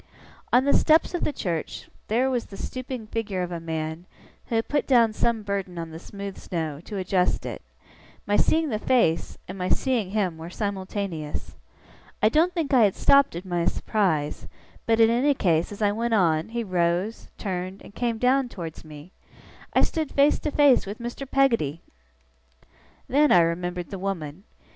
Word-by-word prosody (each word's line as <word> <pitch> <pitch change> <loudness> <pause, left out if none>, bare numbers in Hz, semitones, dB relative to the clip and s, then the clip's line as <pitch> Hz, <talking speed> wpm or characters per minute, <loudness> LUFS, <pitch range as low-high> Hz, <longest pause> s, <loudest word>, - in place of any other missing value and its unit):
On 250 +2 +4
the 280 - +3
steps 315 +3 +4
of 350 - -2
the - - +1
church, 170 - -4 0.2
there 240 +5 +2
was 245 -2 -1
the 195 - -10
stooping 255 -1 -5
figure 210 -4 -3
of 180 - -5
a 170 - -3
man, 160 +1 -4 0.4
who 230 - -2
had 225 - +1
put 290 -1 0
down 235 -4 +4
some 225 0 0
burden 195 -3 -3
on 165 -1 -5
the 160 - -8
smooth 200 +1 -8
snow, 160 -4 -4
to 210 - -6
adjust 185 -1 0
it; - - -5 0.6
my 205 - +1
seeing 320 +5 +2
the 215 -4 -1
face, 225 -10 +1
and 185 +1 -7
my 180 - -1
seeing 245 -8 +1
him, 190 -5 -1
were 165 +1 -7
simultaneous. 190 -5 -4 0.6
I 215 - +4
don't 320 +8 +3
think 325 -6 -2
I 240 -4 +7
had 200 - +1
stopped 280 -7 +4
in 175 - -5
my 175 -2 0
surprise; 170 -11 0 0.4
but, 225 0 +3
in 225 0 +6
any 270 +5 +3
case, 170 -6 +1
as 205 +1 -4
I 205 - +3
went 230 +2 0
on, 165 -4 +2
he 235 +1 -2
rose, 180 +2 -1
turned, 185 -1 -4
and - - -13
came 235 -1 -1
down 255 +2 +2
towards 165 -7 -7
me. 155 +2 -12 0.6
I - - +5
stood 315 -4 -1
face 285 +1 +3
to 300 - -2
face 285 -7 +4
with 205 +2 -5
Mr. 240 +3 -6
Peggotty! 230 - +2 1.3
Then 295 +3 +3
I 175 - +7
remembered 175 +1 -2
the 195 - -5
woman. 185 -2 -4
200 Hz, 180 wpm, -25 LUFS, 175-245 Hz, 1.3 s, I